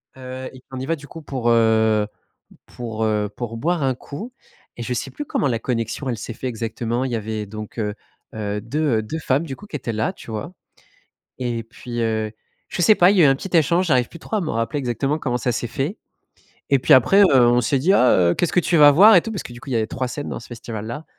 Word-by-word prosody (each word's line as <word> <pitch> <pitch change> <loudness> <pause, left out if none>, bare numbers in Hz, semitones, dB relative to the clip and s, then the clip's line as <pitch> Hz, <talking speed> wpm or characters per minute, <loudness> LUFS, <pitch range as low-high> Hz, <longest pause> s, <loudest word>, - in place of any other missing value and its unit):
Heu, 130 0 -7
et 130 - -13
on 130 - -5
y 130 - -4
va, 165 +2 0
du 145 -1 -13
coup, 160 +1 -10
pour, 130 -4 -2
heu, 110 -2 +3 0.6
pour, 115 -2 -6
heu, 105 -1 0
pour 115 -2 -5
boire 165 +6 0
un 135 -1 +1
coup, 150 - -8 0.4
et - - -6
je - - -3
sais - - -3
plus 295 - -6
comment 145 - 0
la 115 -2 0
connexion, 115 +3 -3
elle 115 - -3
s'est 115 +1 -6
fait 130 - -6
exactement. 115 +1 -3
Il 130 - -4
y 120 - -1
avait 110 -1 -4
donc, 105 +2 -9
heu 105 -2 -1 0.4
heu, 105 -1 -3
2 145 -2 0
heu, - - -1
2 110 +9 -5
femmes, 145 0 0
du 135 -5 -6
coup, 205 - -13
qui 165 - -5
étaient 120 -4 -4
là, 110 +1 0
tu - - -12
vois, 110 +10 -5 0.9
et 120 -2 -2
puis, 120 +1 -6
heu, 110 -1 -1 0.4
je - - -3
sais 215 +4 +6
pas. 180 +2 +6
Il 205 - +1
y 180 - +6
a - - +7
eu - - +7
un 135 - +4
petit 185 +5 -4
échange, 170 +4 +3
j'arrive 125 -5 +2
plus 170 - -12
trop 220 - -5
à - - 0
me 160 - -3
rappeler 115 +5 -1
exactement 135 +4 -1
comment 125 -4 -1
ça 125 +1 -1
s'est 120 - -2
fait, 140 - -3 0.7
et 140 - +5
puis, - - +5
après, 165 - +5
heu, 130 -10 +6
on 120 0 +4
s'est 135 +4 +1
dit: 165 +9 +3
«Ah 125 -10 +5 0.2
heu, - - +1
qu'est-ce 175 - 0
que 180 - +5
tu 170 - +1
vas 145 -1 +9
voir?» 200 +10 +8
et 175 - +7
tout, 225 - -5
parce 205 -5 -4
que, - - -9
du 120 - -11
coup, - - -12
il - - -1
y - - +2
avait 110 -1 +1
3 130 +2 -3
scènes 145 +3 -5
dans - - -5
ce 115 - -12
festival-là. 115 +3 -6
125 Hz, 270 wpm, -21 LUFS, 115-150 Hz, 0.9 s, vas